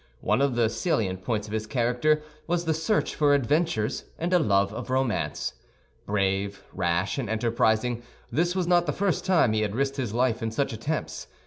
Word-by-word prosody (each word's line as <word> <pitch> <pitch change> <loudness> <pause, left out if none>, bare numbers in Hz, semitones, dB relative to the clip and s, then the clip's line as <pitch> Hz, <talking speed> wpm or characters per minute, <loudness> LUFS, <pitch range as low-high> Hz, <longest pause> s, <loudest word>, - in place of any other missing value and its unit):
One - - +2
of 140 -3 +2
the 120 -2 +3
salient 105 - -1
points 110 -2 -1
of 105 - -8
his 110 0 -2
character 125 +6 +1 0.2
was 170 0 0
the 160 - +2
search 160 +7 0
for 145 -2 +4
adventures 140 -4 0
and 175 +2 -1
a 180 - +6
love 100 -8 +2
of 120 - -6
romance. 130 -2 -1 0.5
Brave, 100 0 0
rash, 90 +6 0
and 120 -6 -3
enterprising, 115 +1 +1 0.3
this 175 +3 +1
was 185 -2 +1
not 175 -1 +3
the 150 - 0
first 200 -1 0
time 165 -12 +4
he 110 - +1
had 105 -1 -1
risked 135 +2 0
his 125 -6 -2
life 120 0 +1
in 115 - -1
such 115 +3 -1
attempts. 140 +8 -4
120 Hz, 190 wpm, -26 LUFS, 110-155 Hz, 0.5 s, a